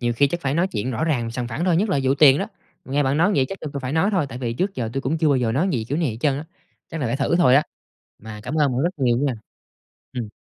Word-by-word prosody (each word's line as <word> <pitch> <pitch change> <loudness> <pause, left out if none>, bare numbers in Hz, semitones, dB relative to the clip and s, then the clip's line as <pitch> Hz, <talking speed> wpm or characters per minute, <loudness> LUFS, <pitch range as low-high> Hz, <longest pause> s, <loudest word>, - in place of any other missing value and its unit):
Nhiều 120 -1 0
khi 140 - +4
chắc 175 +4 -3
phải 135 -2 -1
nói 170 +4 +2
chuyện 110 - -3
rõ 130 +6 -1
ràng, 125 -8 0
sòng 120 +1 -4
phẳng 130 +9 -3
thôi, 180 -3 +3
nhất 205 +6 +1
là 185 - +1
vụ 135 +1 +2
tiền 140 -1 +6
đó. - - -2 0.4
Nghe 140 +2 0
bạn 135 +1 +1
nói 180 +6 +3
vậy 130 -2 +2
chắc 195 - -7
tui 150 - -6
cũng 140 - -4
phải 130 0 -4
nói 170 +6 +2
thôi, 185 -8 +1
tại 125 - -7
vì 120 -3 -2
trước 190 +11 -2
giờ 115 -3 -3
tui 135 - -2
cũng 145 +4 -1
chưa 155 - +2
bao 140 - +3
giờ 120 -3 0
nói 155 +10 +1
gì 115 -6 -1
kiểu 145 - -1
này 160 -6 0
hết 110 - -6
trơn 145 -1 +2
á, 150 - -6 0.4
chắc 165 - -5
là 135 - 0
phải 115 +3 -1
thử 145 +4 +1
thôi 165 -8 +5
á. 145 - +6 0.6
Mà 105 -1 -8
cảm 125 +6 -5
ơn 145 -4 +2
bạn 125 +2 0
rất 170 - +2
nhiều 125 -3 +2
nha. 140 0 +1 0.8
Ừm. 120 -4 -4
140 Hz, 325 wpm, -22 LUFS, 125-160 Hz, 0.8 s, tiền